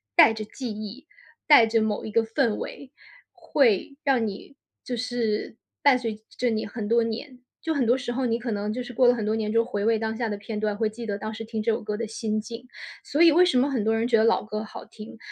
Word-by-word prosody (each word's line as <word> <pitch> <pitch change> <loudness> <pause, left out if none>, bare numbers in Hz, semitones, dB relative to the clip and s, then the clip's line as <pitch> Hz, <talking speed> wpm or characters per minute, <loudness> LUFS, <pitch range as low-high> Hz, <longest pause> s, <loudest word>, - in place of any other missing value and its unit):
带 225 - +8
着 220 -1 -5
记 250 +3 -6
忆、 215 +7 -8 0.4
带 290 -7 +8
着 225 0 +1
某 215 -1 -1
一 220 - -5
个 230 +1 +3
氛 225 -1 0
围， 270 -2 -7 0.4
会 265 +1 +1
让 260 -6 +2
你 205 +7 -8 0.3
就 250 - -3
是 230 -3 -2 0.3
伴 280 -3 +5
随 230 -3 -3
着 215 - -20 0.2
着 245 - +1
你 220 -1 -1
很 210 0 -5
多 235 +1 +3
年。 240 +4 -5 0.2
就 320 - -1
很 280 -5 +1
多 240 +3 +3
时 245 -2 -4
候 260 +1 -1
你 230 -1 0
可 240 -1 -4
能 210 0 -2
就 250 +4 -3
是 245 0 -8
过 250 +2 +3
了 - - +5
很 225 -3 -3
多 215 +1 +1
年 215 -1 -2
之 230 - +3
后 230 - +2
回 205 -4 -3
味 225 0 +2
当 220 0 -2
下 230 -1 -2
的 205 - -3
片 210 +2 -6
段， 210 -1 -1
会 220 0 +1
记 230 +2 -8
得 205 -2 -2
当 215 +1 -5
时 225 +1 -6
听 220 0 -4
这 220 - -1
首 220 - -2
歌 210 -1 -3
的 230 0 -3
心 215 0 -2
境。 230 +3 -8 0.4
所 295 - -1
以 335 -2 +8
为 350 +4 +6
什 355 -8 +3
么 270 +3 +2
很 255 -6 -1
多 220 +1 +2
人 225 +1 0
觉 245 - +3
得 220 - +4
老 230 +1 +3
歌 215 0 -4
好 220 - -10
听， 215 +1 -11
225 Hz, 290 characters per minute, -25 LUFS, 215-245 Hz, 0.4 s, 带